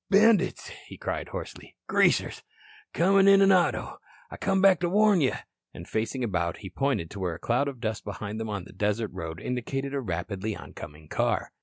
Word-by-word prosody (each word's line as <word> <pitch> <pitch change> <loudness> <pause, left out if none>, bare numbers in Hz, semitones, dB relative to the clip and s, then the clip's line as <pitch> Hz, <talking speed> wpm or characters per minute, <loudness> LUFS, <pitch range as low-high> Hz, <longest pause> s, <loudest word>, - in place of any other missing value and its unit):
"Bandits," 215 +1 +3 0.2
he - - -10
cried - - -4
hoarsely. - - -8
"Greasers. - - +2 0.5
Comin' 195 +3 +4
in 195 0 +7
an 195 0 +6
auto. 185 -2 +1 0.3
I - - -7
come 195 -1 +1
back 190 -2 +5
to 175 -1 0
warn 205 -1 +4
you." 130 - +2 0.4
And 85 - -9
facing 115 +4 -2
about 90 -6 -1
he 95 -4 -9
pointed 135 - -1
to 100 - -8
where 90 -3 -2
a - - -11
cloud 125 +4 +1
of 135 -3 -6
dust 110 -2 -3
behind 105 +2 -5
him 110 - -4
on 100 -3 -3
the - - -14
desert 105 +2 -1
road 80 0 -6
indicated 135 +3 -3
a 140 - -1
rapidly 100 +1 -3
oncoming 75 +1 -11
car. - - -1
115 Hz, 190 wpm, -27 LUFS, -, 0.5 s, in